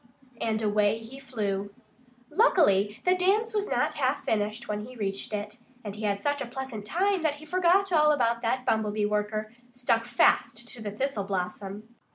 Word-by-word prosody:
And 220 Hz, -1 st, 0 dB
away 210 Hz, 0 st, +2 dB
he 225 Hz, +4 st, -10 dB
flew. 205 Hz, -6 st, -3 dB, 0.6 s
Luckily 215 Hz, -, +3 dB
the 365 Hz, -, +5 dB
dance 410 Hz, +5 st, +2 dB
was 415 Hz, -1 st, -1 dB
not -, -, +1 dB
half -, -, 0 dB
finished 215 Hz, +2 st, -1 dB
when 210 Hz, 0 st, -3 dB
he 255 Hz, +3 st, -10 dB
reached 200 Hz, -3 st, -3 dB
it. 210 Hz, +2 st, -4 dB, 0.2 s
And 205 Hz, -2 st, -6 dB
he 215 Hz, 0 st, -4 dB
had 200 Hz, -1 st, -1 dB
such 290 Hz, 0 st, 0 dB
a 260 Hz, -, -3 dB
pleasant 245 Hz, -4 st, -6 dB
time 375 Hz, -, +1 dB
that 310 Hz, -2 st, +1 dB
he 300 Hz, +1 st, -12 dB
forgot 370 Hz, +3 st, +3 dB
all 300 Hz, -1 st, +5 dB
about 235 Hz, -5 st, +1 dB
that 250 Hz, +2 st, -1 dB
Bumblebee 215 Hz, -1 st, +1 dB
worker, 210 Hz, +1 st, -2 dB, 0.2 s
stuck 235 Hz, -2 st, +1 dB
fast 235 Hz, +1 st, +2 dB
to 240 Hz, -, -5 dB
the 210 Hz, -, -3 dB
thistle 215 Hz, -1 st, -2 dB
blossom. 195 Hz, +2 st, -4 dB
225 Hz, 180 wpm, -28 LUFS, 210-290 Hz, 0.6 s, the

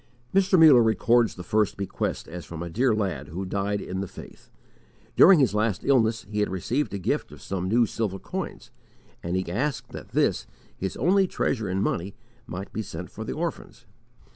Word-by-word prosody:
Mr. 190 Hz, 0 st, +4 dB
Muller 150 Hz, -7 st, +8 dB
records 115 Hz, +1 st, +3 dB
the 90 Hz, -, -8 dB
first 105 Hz, +1 st, +1 dB
bequest 100 Hz, -1 st, -3 dB
as 90 Hz, +1 st, -7 dB
from 85 Hz, 0 st, -7 dB
a 85 Hz, -, -6 dB
dear 125 Hz, +7 st, +2 dB
lad 90 Hz, -10 st, -2 dB
who 90 Hz, +6 st, -5 dB
died 100 Hz, +2 st, -1 dB
in 95 Hz, 0 st, -5 dB
the 100 Hz, -, -4 dB
faith. -, -, -13 dB, 0.7 s
During 190 Hz, 0 st, +8 dB
his 130 Hz, -, +3 dB
last 105 Hz, -2 st, 0 dB
illness, 115 Hz, -5 st, +2 dB
he 105 Hz, 0 st, -3 dB
had 105 Hz, -, +1 dB
received 120 Hz, -, -1 dB
a -, -, -1 dB
gift 95 Hz, -, -2 dB
of -, -, -12 dB
some 95 Hz, -1 st, -3 dB
new 120 Hz, +3 st, +4 dB
silver 105 Hz, -3 st, -3 dB
coins; -, -, -6 dB, 0.5 s
and 85 Hz, +1 st, -3 dB
he 95 Hz, 0 st, -1 dB
asked 130 Hz, +7 st, -2 dB
that -, -, -9 dB
this, -, -, +1 dB, 0.3 s
his 95 Hz, -, -4 dB
only 190 Hz, +2 st, +3 dB
treasure 110 Hz, -, -1 dB
in 95 Hz, +2 st, 0 dB
money, 95 Hz, -1 st, -2 dB, 0.3 s
might 95 Hz, +2 st, -7 dB
be 110 Hz, -, -2 dB
sent 105 Hz, -, -7 dB
for -, -, -7 dB
the -, -, -4 dB
orphans. -, -, -5 dB
105 Hz, 190 wpm, -26 LUFS, 95-120 Hz, 0.7 s, Muller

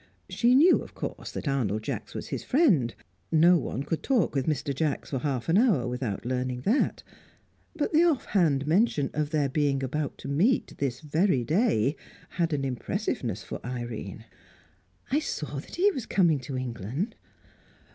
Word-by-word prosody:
She 245 Hz, +1 st, +3 dB
knew, 325 Hz, +7 st, +6 dB
of -, -, -11 dB
course, -, -, -5 dB
that -, -, -5 dB
Arnold 110 Hz, -6 st, 0 dB
Jacks -, -, -5 dB
was -, -, -5 dB
his -, -, -4 dB
friend; 200 Hz, -, +3 dB, 0.4 s
no 170 Hz, +2 st, +6 dB
one 135 Hz, -1 st, -3 dB
could 165 Hz, +2 st, -3 dB
talk 245 Hz, -, +1 dB
with 135 Hz, 0 st, -1 dB
Mr. 150 Hz, -2 st, -1 dB
Jacks 145 Hz, +1 st, -2 dB
for 135 Hz, -, -1 dB
half 130 Hz, -3 st, -2 dB
an 170 Hz, +5 st, +4 dB
hour 205 Hz, -, +3 dB
without 125 Hz, -4 st, -3 dB
learning 125 Hz, 0 st, -2 dB
that; 225 Hz, -, +1 dB, 0.7 s
but 300 Hz, -1 st, -1 dB
the 310 Hz, -, +6 dB
off 315 Hz, -8 st, +2 dB
hand 150 Hz, -8 st, +2 dB
mention 160 Hz, -3 st, +2 dB
of 150 Hz, -1 st, -1 dB
their 150 Hz, -2 st, +1 dB
being 135 Hz, -1 st, 0 dB
about 145 Hz, +2 st, -2 dB
to -, -, -9 dB
meet 175 Hz, -, +1 dB
this 130 Hz, -3 st, -2 dB
very 155 Hz, -2 st, +1 dB
day 150 Hz, -, +2 dB, 0.3 s
had 170 Hz, -2 st, -1 dB
an 140 Hz, -2 st, -1 dB
impressiveness 125 Hz, -, -3 dB
for -, -, -7 dB
Irene. 120 Hz, -4 st, -6 dB, 0.9 s
"I 285 Hz, -, +3 dB
saw 150 Hz, -, -4 dB
that -, -, -10 dB
he 395 Hz, +4 st, +4 dB
was 265 Hz, -, -5 dB
coming 170 Hz, -7 st, +3 dB
to 130 Hz, +1 st, -5 dB
England." 130 Hz, -, -3 dB
145 Hz, 170 wpm, -27 LUFS, 130-190 Hz, 0.9 s, knew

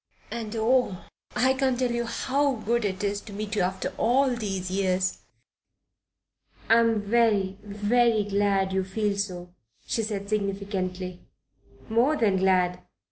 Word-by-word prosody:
"And 230 Hz, -1 st, -5 dB
oh! 225 Hz, -4 st, +1 dB, 0.3 s
I 260 Hz, +1 st, +3 dB
can't 260 Hz, -1 st, +1 dB
tell 250 Hz, -1 st, 0 dB
you 235 Hz, 0 st, -1 dB
how 275 Hz, +3 st, 0 dB
good 235 Hz, +1 st, -1 dB
it 190 Hz, 0 st, -2 dB
is 200 Hz, 0 st, -1 dB
to 210 Hz, -, -11 dB
meet 205 Hz, 0 st, -5 dB
you 200 Hz, -, +1 dB
after 185 Hz, +1 st, -2 dB
all 255 Hz, +2 st, +3 dB
these 195 Hz, -5 st, -3 dB
years." 185 Hz, -1 st, 0 dB, 1.5 s
"I'm 230 Hz, -2 st, +4 dB
very, 205 Hz, -3 st, +2 dB
very 210 Hz, +2 st, +2 dB
glad 200 Hz, -1 st, +1 dB
you 190 Hz, 0 st, +1 dB
feel 205 Hz, +2 st, -1 dB
so," 180 Hz, -3 st, -4 dB, 0.3 s
she 230 Hz, -, -1 dB
said 205 Hz, -2 st, -3 dB
significantly. 195 Hz, -3 st, -3 dB, 0.7 s
"More 240 Hz, +7 st, +3 dB
than 205 Hz, -6 st, +2 dB
glad. 185 Hz, -1 st, +2 dB
205 Hz, 135 wpm, -26 LUFS, 190-235 Hz, 1.5 s, I'm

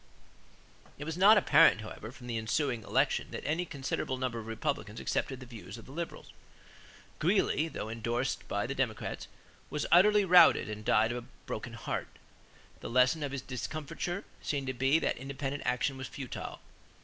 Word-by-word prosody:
It 145 Hz, -, -6 dB
was 160 Hz, +1 st, -4 dB
not 200 Hz, +4 st, +7 dB
apparent, 180 Hz, -, +6 dB
however, 110 Hz, +1 st, -8 dB
from 125 Hz, -1 st, -13 dB
the 120 Hz, -2 st, -2 dB
ensuing 120 Hz, +2 st, 0 dB
election -, -, +1 dB
that -, -, -7 dB
any 160 Hz, +4 st, 0 dB
considerable 135 Hz, -3 st, -3 dB
number 125 Hz, -2 st, -2 dB
of 110 Hz, -, -8 dB
Republicans 115 Hz, -2 st, -3 dB
accepted 130 Hz, -2 st, -2 dB
the 130 Hz, -, -9 dB
views 115 Hz, -3 st, -9 dB
of 115 Hz, -, -12 dB
the -, -, -12 dB
Liberals. 170 Hz, +3 st, -6 dB, 0.9 s
Greeley, 165 Hz, -2 st, +2 dB
though 130 Hz, -, -5 dB
indorsed 115 Hz, +3 st, -2 dB
by 100 Hz, 0 st, -1 dB
the 140 Hz, -, -3 dB
Democrats, 125 Hz, -5 st, -2 dB, 0.4 s
was 150 Hz, -, -2 dB
utterly 205 Hz, +3 st, +6 dB
routed 180 Hz, -1 st, +7 dB
and 105 Hz, 0 st, -6 dB
died 110 Hz, +2 st, +3 dB
of 120 Hz, 0 st, -4 dB
a -, -, -18 dB, 0.2 s
broken 115 Hz, +2 st, -5 dB
heart. 115 Hz, -, -3 dB, 0.7 s
The -, -, -6 dB
lesson 130 Hz, +6 st, +3 dB
of 145 Hz, -2 st, -2 dB
his 135 Hz, -2 st, -4 dB
discomfiture 155 Hz, -, -4 dB, 0.2 s
seemed 140 Hz, -2 st, -2 dB
to 130 Hz, -, -2 dB
be 135 Hz, +4 st, +3 dB
that 160 Hz, -, -1 dB
independent 140 Hz, +1 st, -4 dB
action 125 Hz, +2 st, 0 dB
was 130 Hz, -, -5 dB
futile. 135 Hz, -4 st, -7 dB
130 Hz, 175 wpm, -31 LUFS, 115-150 Hz, 0.9 s, not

